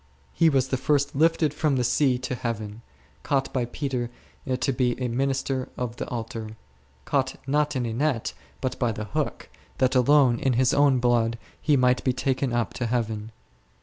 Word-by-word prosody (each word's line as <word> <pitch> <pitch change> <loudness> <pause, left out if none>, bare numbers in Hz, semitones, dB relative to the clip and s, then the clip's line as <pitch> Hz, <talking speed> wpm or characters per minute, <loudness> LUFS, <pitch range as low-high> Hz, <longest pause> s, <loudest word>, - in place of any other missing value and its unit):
He 165 - +4
was 135 -3 +1
the 130 - 0
first 140 +2 +1
lifted 160 0 +3
from 150 -2 +1
the 125 - +1
sea 125 +1 +2
to 130 +1 -4
Heaven, 110 -3 -4 0.4
caught 140 -2 -1
by 125 -2 0
Peter 125 -1 -3 0.4
to 130 +2 0
be 125 -1 0
a 125 - -1
minister 135 +1 -1
of 120 -1 -4
the - - -4
Altar; 115 -2 -5 0.5
caught, 130 -2 0
not 150 +1 +1
in 125 -2 0
a 115 - -3
net, 130 -2 0 0.3
but 130 - -2
by 120 -3 +1
the 110 0 -5
hook, 105 - -3 0.3
that 130 0 +2
alone 130 -2 +4
in 135 - +1
his 125 +1 +3
own 140 -2 +4
blood 120 -2 +2 0.2
he 150 -2 +3
might 125 0 +3
be 130 - +2
taken 130 0 -1
up 120 -1 -1
to 120 - -2
Heaven. 110 -2 -2
125 Hz, 180 wpm, -25 LUFS, 120-135 Hz, 0.5 s, He